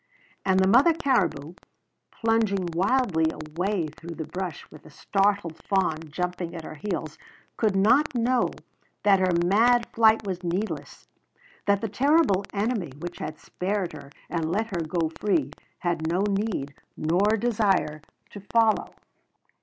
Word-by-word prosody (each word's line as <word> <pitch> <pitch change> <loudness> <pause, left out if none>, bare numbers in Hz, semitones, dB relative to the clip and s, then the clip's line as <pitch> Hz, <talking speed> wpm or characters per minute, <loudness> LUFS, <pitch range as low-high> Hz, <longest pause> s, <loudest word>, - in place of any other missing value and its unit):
And 190 -1 +3
the 190 - +4
mother 260 - +6
caribou, 190 - 0 0.6
plunging 220 -5 0
wildly 190 -3 +2
away 170 +5 -2
through 165 +2 -9
the 160 - -5
brush 180 -2 -5
with 155 - -13
the - - -15
startled 195 0 0
fawn 190 -5 +1
jumping 180 +2 -3
at 165 - -6
her - - -8
heels, 155 -2 -5 0.4
could 215 -4 +1
not 245 +9 +3
know 245 +1 +2 0.5
that 200 -2 +5
her 185 -1 +2
mad 230 +5 +4
flight 220 -1 +4
was 185 -2 -3
needless; 180 +5 -4 0.6
that 200 0 +3
the 225 - -1
terrible 260 - +3
enemy 205 - -1
which 175 +3 -7
had 155 0 -5
spared 190 +1 -3
her 140 -2 -10 0.2
and 165 -2 -2
let 215 +1 -1
her 170 - 0
go 160 0 -1
free 165 -10 +1 0.3
had 165 -2 -1
no 180 +3 +1
need 200 -8 -1 0.2
nor 190 +8 +2
desire 200 -9 +1 0.3
to 205 - -8
follow. 220 +2 +1
190 Hz, 145 wpm, -26 LUFS, 165-220 Hz, 0.6 s, mother